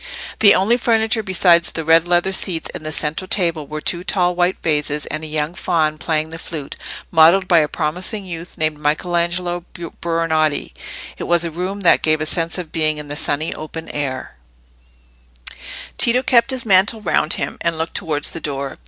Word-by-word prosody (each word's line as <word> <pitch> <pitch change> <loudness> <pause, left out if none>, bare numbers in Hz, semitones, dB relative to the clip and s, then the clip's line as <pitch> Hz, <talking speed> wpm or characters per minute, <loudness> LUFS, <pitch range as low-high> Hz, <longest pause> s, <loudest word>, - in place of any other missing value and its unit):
The 205 -2 +7
only 210 +6 +2
furniture 225 -2 +1
besides 180 -3 +3
the 160 - -5
red 165 +1 +5
leather 175 +2 +2
seats 175 -3 -1
and - - -7
the 155 - -4
central 155 +4 -1
table 170 -7 -1
were 155 0 -6
two 175 +2 -1
tall 180 -2 +1
white 180 +1 +1
vases, 150 -2 0
and 155 +1 -5
a - - -5
young 155 +1 -2
faun 155 -4 0
playing 155 0 -1
the 165 - -7
flute, 155 -5 -6 0.4
modelled 170 +3 +5
by 175 -3 +5
a 150 - +2
promising 180 +7 -3
youth 170 -1 -8
named 155 -1 -1
Michelangelo 175 +3 -1
Buonarotti. 165 -3 -1 0.5
It - - -4
was 170 0 +2
a 165 - -4
room 185 +5 -4
that 175 - +4
gave 155 0 +2
a 155 - -2
sense 165 +2 0
of 170 -4 -6
being 155 -1 +1
in 150 -1 -7
the 145 - -3
sunny 150 +2 0
open 160 +1 -8
air. 130 - -4 1.6
Tito 245 +2 +4
kept 240 -3 +3
his 260 -3 -2
mantle 200 +2 +3
round 160 -4 +1
him, - - -4
and 170 -1 -1
looked 160 +1 -3
towards 150 -6 -1
the 165 - -6
door. 140 -2 -5
165 Hz, 185 wpm, -19 LUFS, 155-180 Hz, 1.6 s, The